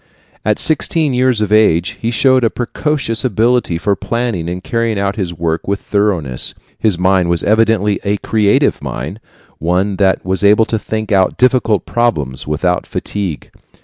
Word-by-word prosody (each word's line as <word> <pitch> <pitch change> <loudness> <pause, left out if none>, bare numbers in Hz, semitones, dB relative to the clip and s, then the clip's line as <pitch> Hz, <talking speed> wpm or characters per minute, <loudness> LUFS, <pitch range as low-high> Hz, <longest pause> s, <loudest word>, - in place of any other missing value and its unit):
At 105 0 +1
sixteen 155 -1 +1
years 125 -3 +2
of 105 - -1
age 100 -5 +3
he 115 - -1
showed 130 +2 +3
a 115 - +3
precocious 125 -2 -2
ability 120 -5 +1
for 100 +4 0
planning 115 -7 -3
and 90 +1 -5
carrying 115 -2 -1
out 100 0 -1
his 95 -5 -3
work 80 -1 -3
with 100 0 -1
thoroughness. 90 -12 -1 0.2
His 105 -6 +2
mind 90 -1 +2
was 85 -2 +1
evidently 110 -2 +2
a 105 0 0
creative 105 -1 +1
mind, 80 - -5 0.4
one 90 +4 0
that 95 -2 +1
was 95 +2 -1
able 105 +2 +5
to 110 - -2
think 110 +1 -4
out 95 -2 +2
difficult 125 -5 +2
problems 75 - -1
without 90 +4 -1
fatigue. 95 -7 -4
105 Hz, 160 wpm, -15 LUFS, 90-115 Hz, 0.4 s, able